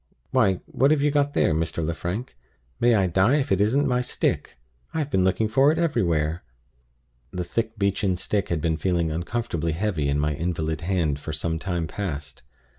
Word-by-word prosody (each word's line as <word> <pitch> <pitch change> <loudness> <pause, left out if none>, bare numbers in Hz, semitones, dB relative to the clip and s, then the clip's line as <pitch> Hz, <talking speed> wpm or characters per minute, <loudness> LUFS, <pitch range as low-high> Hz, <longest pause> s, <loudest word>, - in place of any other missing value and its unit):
Why, 105 -9 +3
what 135 - +2
have 150 -2 +3
you 150 - +3
got 145 0 +1
there, 85 - +3
Mr. 80 0 -1
Lefrank? 85 - -4 0.4
May 120 -1 +4
I 100 -3 +3
die 95 - +3
if 145 -2 0
it 95 0 +3
isn't 135 +8 +3
my 125 -1 +1
stick! 125 - -2 0.4
I - - 0
have 150 -2 -2
been 95 -6 +3
looking 95 +4 +2
for 135 +7 +4
it 160 - -1
everywhere!" 85 - 0 0.9
The 90 +4 -3
thick 110 +5 -3
beechen 100 -1 +1
stick 100 +2 -1
had 85 -3 -1
been 80 0 0
feeling 85 -3 0
uncomfortably 85 -1 -2
heavy 85 -5 -1
in 70 +1 +1
my 75 +1 +1
invalid 80 -1 -2
hand 85 -5 0
for 75 - -6
some 80 +2 -2
time 85 -2 -2
past. 75 -6 -5
95 Hz, 190 wpm, -25 LUFS, 80-115 Hz, 0.9 s, May